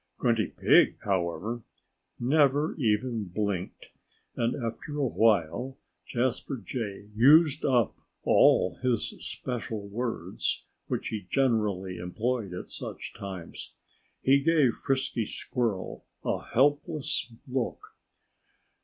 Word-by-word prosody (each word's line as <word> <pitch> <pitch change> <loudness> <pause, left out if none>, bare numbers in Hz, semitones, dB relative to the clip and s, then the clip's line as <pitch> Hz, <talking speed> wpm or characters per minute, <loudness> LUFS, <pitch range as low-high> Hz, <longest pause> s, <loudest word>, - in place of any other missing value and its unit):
Grunty 115 -3 +2
Pig, - - +4
however, 100 +5 -1 0.6
never 145 +3 +3
even 110 -1 +1
blinked. 95 0 -3 0.4
And 120 0 0
after 120 +4 -5
a 145 - +1
while 110 +2 +2 0.3
Jasper 130 +2 -1
Jay 105 -1 -5
used 150 +6 +6
up 125 -6 +2 0.3
all 90 -2 +4
his 125 -3 +1
special 115 -4 -4
words, 115 +3 -2 0.2
which - - -2
he 105 -4 -5
generally 105 -7 +1
employed 105 +4 -2
at 90 - -6
such - - -7
times. 95 -4 -8 0.5
He 135 +1 +5
gave 145 -4 +4
Frisky 130 -5 -1
Squirrel 115 -7 -3 0.2
a - - -1
helpless 145 -2 +1 0.2
look. 130 -2 -3
115 Hz, 100 wpm, -28 LUFS, 100-130 Hz, 0.6 s, used